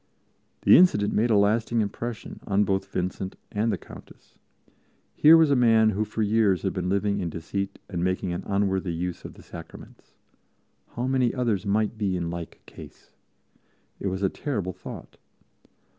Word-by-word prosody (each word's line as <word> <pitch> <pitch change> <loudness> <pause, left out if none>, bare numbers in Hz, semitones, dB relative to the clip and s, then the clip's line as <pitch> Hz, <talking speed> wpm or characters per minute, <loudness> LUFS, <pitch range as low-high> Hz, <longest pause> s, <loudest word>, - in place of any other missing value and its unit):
The - - +8
incident 170 - +4
made 115 +3 +2
a 110 - +4
lasting 110 +3 +2
impression 110 +2 -4
on 100 0 +3
both 95 -1 -1
Vincent 95 +1 -3 0.2
and 110 +2 0
the 100 - -1
Countess. - - -15 0.7
Here 160 +2 +7
was 160 -3 +4
a - - +5
man 115 -3 +4
who 105 +2 -1
for 110 +1 -2
years 105 -4 +2
had - - -1
been 90 -2 -2
living 100 +1 0
in 90 -3 -2
deceit 95 +5 -4
and 90 -3 -3
making 95 0 -1
an 85 - -4
unworthy 95 -3 0
use 90 +1 -4
of - - -9
the - - -15
Sacraments. 85 -1 -12 0.8
How 120 - -2
many 130 -2 +1
others 115 -7 -1
might 110 +2 0
be 95 -4 0
in 85 -1 -3
like 85 -1 -8
case! - - -14 0.9
It - - -3
was 95 +1 -3
a 95 - +3
terrible 105 -11 -3
thought. - - -10
100 Hz, 170 wpm, -25 LUFS, 95-115 Hz, 0.9 s, The